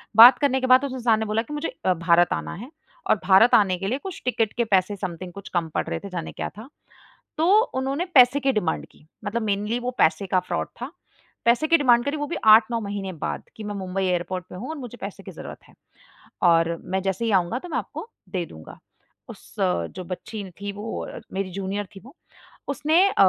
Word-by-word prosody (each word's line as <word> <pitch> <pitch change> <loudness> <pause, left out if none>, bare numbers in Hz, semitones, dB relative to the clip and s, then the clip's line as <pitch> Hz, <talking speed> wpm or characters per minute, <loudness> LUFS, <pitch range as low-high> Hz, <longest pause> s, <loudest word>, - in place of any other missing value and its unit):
बात 240 +3 +10
करने 275 -2 +2
के 260 - 0
बाद 255 +2 +6
उस 270 - -4
इंसान 230 -4 +2
ने 220 - -1
बोला 215 +1 0
कि 240 - -9
मुझे 295 +2 -3 0.2
अ, 185 - +4
भारत 170 +1 +3
आना - - -4
है 240 - -9 0.4
और - - +6
भारत 195 +5 +6
आने 190 -4 +3
के 195 +2 -4
लिए 255 - 0
कुछ 380 -3 -7
टिकट 230 -4 0
के 240 - +3
पैसे 195 -1 +2
समथिंग 180 -2 -6
कुछ 200 +1 -10
कम 170 -2 0
पड़ - - 0
रहे - - -3
थे, 200 - -9
जाने 175 -3 -5
क्या - - -4
था? 220 +6 -12 0.7
तो 385 +7 +5
उन्होंने 270 +6 -1
पैसे 255 +1 +7
की 270 0 +2
डिमांड 175 -9 -1
की। 150 - -23 0.2
मतलब 230 +3 -2
मेनली 210 +2 -1
वो 245 0 -3
पैसे 160 +5 +3
का 185 0 +2
फ्रॉड 180 - -3
था। - - -4 0.5
पैसे 240 +6 +3
की 335 - +6
डिमांड 240 -4 +4
करी 285 +2 -1
वो 295 - -3
भी 345 - -4
8-9 220 +2 +6
महीने 200 -2 -4
बाद - - -3
कि 220 - -8
मैं 205 0 -4
मुंबई 190 0 -3
एयरपोर्ट 180 0 -1
पे - - -9
हूँ 245 +9 -6
और 320 - -4
मुझे 245 -3 -8
पैसे - - -7
की - - -9
ज़रूरत - - -9
है - - -20 0.7
और 170 -1 +4
मैं 190 +1 -1
जैसे 195 +4 -1
ही 225 - 0
आऊँगा 190 +5 +1
तो 355 - -10
मैं - - -1
आपको - - -6 0.2
दे 180 -2 -2
दूँगा। 80 - -12 0.5
उस - - -13
जो 90 - -1
बच्ची 200 +3 -6 0.2
थी 205 - -3
वो 225 +2 -5 0.3
मेरी 190 -1 -3
जूनियर 195 +2 -3
थी 195 - -9
वो, 265 - -15 0.5
उसने 305 +5 +2
अ, - - -4
210 Hz, 225 wpm, -24 LUFS, 185-250 Hz, 0.7 s, बात